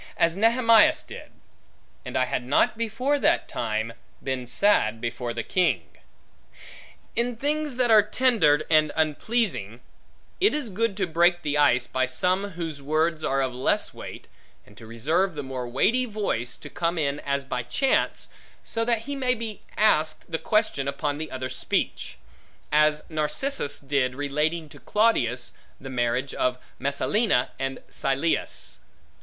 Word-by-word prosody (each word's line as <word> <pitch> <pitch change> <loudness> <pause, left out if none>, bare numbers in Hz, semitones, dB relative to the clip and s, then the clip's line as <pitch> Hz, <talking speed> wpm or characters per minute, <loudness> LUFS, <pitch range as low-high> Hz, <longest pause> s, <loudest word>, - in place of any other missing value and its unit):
As 170 0 +3
Nehemias 230 +1 +5
did; - - -10 0.7
And - - -4
I 130 - +3
had 125 - -2
not 130 - +2
before 230 +6 0
that - - +2
time, 110 0 -2 0.3
been 130 -2 -3
sad 120 - +3
before 120 +1 -3
the 115 -1 -3
king. 160 - +1 1.3
In 240 +1 0
things 295 +2 -1
that 245 -2 +2
are 215 -1 +8
tender 210 - +3
and 155 -2 +4
unpleasing, 155 - -1 0.6
it 390 -3 +3
is 280 -8 -2
good 205 +1 -1
to 195 - +1
break 175 +1 +2
the 145 -1 -1
ice, 135 -4 +4
by 130 0 0
some 185 +8 0
whose 165 -4 -5
words 155 +3 0
are 135 0 +1
of 130 -1 -2
less 125 +1 0
weight, - - -9 0.4
and 105 - -19
to 110 - -12
reserve 155 +11 0
the 145 - -4
more 130 -2 -5
weighty 225 - +2
voice, 195 - -2
to - - -10
come 170 0 -1
in 145 -2 0
as 140 -1 -2
by 125 -2 -2
chance, 265 - 0 0.3
so 230 - -2
that 230 -1 0
he 285 +3 -4
may 255 -2 +1
be 225 -2 -6 0.2
asked 155 -7 +2
the 160 - -1
question 215 -11 +1
upon 145 +1 -2
the 155 -1 -5
other's 130 0 -5
speech: - - -2 0.5
as 150 0 +3
Narcissus 155 - -1
did, 135 -2 0
relating 150 +3 -1
to - - -14
Claudius 125 - +1 0.3
the 135 0 -8
marriage 125 +2 -1
of 125 0 0 0.2
Messalina 140 - +1
and 135 0 -3
Silius. 135 +4 -1
155 Hz, 150 wpm, -25 LUFS, 130-215 Hz, 1.3 s, are